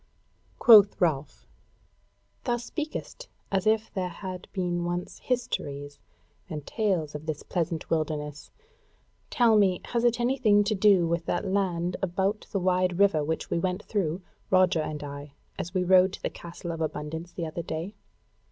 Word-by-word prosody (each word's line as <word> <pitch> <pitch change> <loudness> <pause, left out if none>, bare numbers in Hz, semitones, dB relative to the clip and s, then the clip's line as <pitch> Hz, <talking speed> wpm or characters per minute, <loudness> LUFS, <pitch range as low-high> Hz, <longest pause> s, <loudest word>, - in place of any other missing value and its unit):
Quoth 210 -4 +7
Ralph: 150 -5 -1 1.0
"Thou 240 - +1
speakest 310 - -6 0.2
as 195 0 +1
if 220 0 +1
there 185 -3 -2
had 185 +1 -7
been 175 -3 -1
once 175 +1 -4
histories 145 - -3 0.5
and 150 -4 -5
tales 185 -9 -1
of 150 +1 -7
this 155 -2 -3
pleasant 170 -2 -2
wilderness: 150 -2 -2 0.8
tell 235 -3 +4
me, 195 -4 +4
has 235 -1 0
it 240 0 +3
anything 240 -4 +3
to 210 +2 0
do 195 -4 +4
with 170 0 -1
that 175 - -1
land 180 -3 0
about 190 +3 -1
the 200 - 0
wide 180 -1 +1
river 190 -6 +4
which 160 +2 -3
we - - +1
went 185 +3 -2
through, 185 -3 -2 0.3
Roger 185 -3 +4
and 155 -1 -4
I, 145 0 -8 0.3
as 175 - -4
we 185 - +2
rode 185 +1 +5
to - - -8
the - - -1
Castle 170 0 -7
of 165 -1 -5
Abundance 160 +2 -4
the 170 - -4
other 160 +2 -4
day? 165 +4 -5
180 Hz, 160 wpm, -27 LUFS, 160-200 Hz, 1.0 s, Quoth